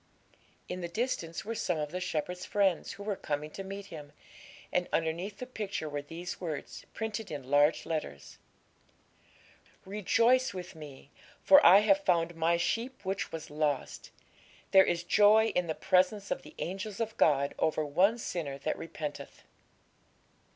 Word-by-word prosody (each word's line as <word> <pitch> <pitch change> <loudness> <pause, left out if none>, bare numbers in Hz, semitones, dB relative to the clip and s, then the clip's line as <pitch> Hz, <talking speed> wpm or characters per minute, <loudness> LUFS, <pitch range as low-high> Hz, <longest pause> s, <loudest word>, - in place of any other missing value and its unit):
In 180 0 -5
the 170 - -3
distance 170 -5 -3
were 225 - -3
some 180 -6 -1
of 150 -1 -3
the 180 - -3
shepherd's 180 +1 -3
friends, 195 -4 +1
who 200 - -9
were 205 -1 -2
coming 150 -2 -4
to 195 - -7
meet 195 +1 -7
him, 145 -2 -9 0.6
and 180 0 0
underneath 170 +5 -1
the 250 - -6
picture 210 -9 -4
were 145 -1 -4
these 170 +6 -7
words, 155 -5 -6
printed 220 -1 -4
in 140 -3 -7
large 145 +2 +4
letters 150 - -5 1.5
'Rejoice 230 +4 +2
with 185 +1 -7
Me, 145 -3 -12 0.3
for 285 0 +8
I 190 +4 +9
have 195 -2 +3
found 170 -2 +2
My 165 +1 +2
sheep 235 +8 -2
which 190 +1 -2
was 160 -2 -7
lost. 150 -2 -2 0.6
There 190 -1 +8
is 170 0 -1
joy 215 +4 +5
in 180 -1 -1
the 160 - -2
presence 190 +2 +1
of - - -1
the - - -15
angels 195 +4 -5
of 225 -1 -2
God 140 -2 +3
over 155 -1 +1
one 185 +10 +3
sinner 160 -11 -4
that 150 +3 -3
repenteth.' 155 -3 -7
180 Hz, 160 wpm, -30 LUFS, 155-200 Hz, 1.5 s, I